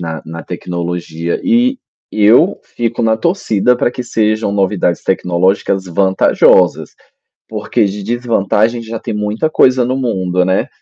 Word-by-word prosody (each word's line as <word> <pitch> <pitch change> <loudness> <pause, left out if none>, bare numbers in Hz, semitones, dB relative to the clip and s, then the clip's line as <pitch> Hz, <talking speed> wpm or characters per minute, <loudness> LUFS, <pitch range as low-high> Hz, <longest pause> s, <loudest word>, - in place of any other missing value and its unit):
na-na 80 0 -6
tecnologia 85 -1 -4
e 255 +1 +2 0.3
e 105 - 0
eu 125 - +4
fico 120 0 -3
na 110 -1 +2
torcida 125 - +1
para 120 - 0
que 125 - -6
sejam 110 -3 0
novidades 95 -3 0
tecnológicas 95 +1 0
vantajosas, 95 +2 +2 0.5
porque - - -1
de 100 +1 -5
desvantagem 115 0 0
já 115 0 -6
tem - - -6
muita 105 +9 -2
coisa 130 -4 +3
no 125 - -1
mundo, 95 -8 -1
né 95 +1 0
105 Hz, 135 wpm, -14 LUFS, 95-120 Hz, 0.5 s, eu